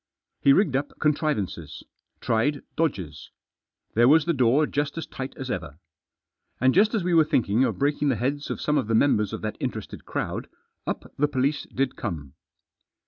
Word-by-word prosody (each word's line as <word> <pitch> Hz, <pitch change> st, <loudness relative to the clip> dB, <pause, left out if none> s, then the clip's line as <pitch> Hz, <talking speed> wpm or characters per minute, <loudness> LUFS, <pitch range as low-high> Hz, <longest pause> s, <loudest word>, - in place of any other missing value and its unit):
He 140 Hz, -, +5 dB
rigged 145 Hz, -3 st, +3 dB
up 145 Hz, +2 st, -1 dB
contrivances; 115 Hz, -, -1 dB, 0.4 s
tried 135 Hz, +6 st, +1 dB
dodges. 90 Hz, -, -2 dB, 0.6 s
There 120 Hz, +2 st, +5 dB
was 155 Hz, +3 st, +6 dB
the 170 Hz, -, +2 dB
door 130 Hz, +2 st, +3 dB
just 145 Hz, +1 st, -2 dB
as 165 Hz, -, -3 dB
tight 130 Hz, 0 st, -7 dB
as 130 Hz, -1 st, -4 dB
ever. 75 Hz, +1 st, -5 dB, 0.8 s
And 130 Hz, +1 st, +4 dB
just 210 Hz, +5 st, +4 dB
as 210 Hz, -, 0 dB
we 180 Hz, 0 st, 0 dB
were 165 Hz, -1 st, +7 dB
thinking 120 Hz, -5 st, +2 dB
of -, -, 0 dB
breaking 145 Hz, +1 st, +1 dB
the 130 Hz, -, +2 dB
heads 140 Hz, +6 st, -2 dB
of -, -, -3 dB
some 150 Hz, -1 st, +1 dB
of 125 Hz, -, -3 dB
the 115 Hz, -, +1 dB
members 105 Hz, -5 st, +3 dB
of -, -, -5 dB
that 110 Hz, -1 st, -3 dB
interested -, -, -5 dB
crowd, -, -, -3 dB, 0.4 s
up -, -, -4 dB
the 150 Hz, -, +4 dB
police 140 Hz, +1 st, -1 dB
did 135 Hz, 0 st, -1 dB
come. 75 Hz, -, -5 dB
135 Hz, 180 wpm, -25 LUFS, 115-150 Hz, 0.8 s, were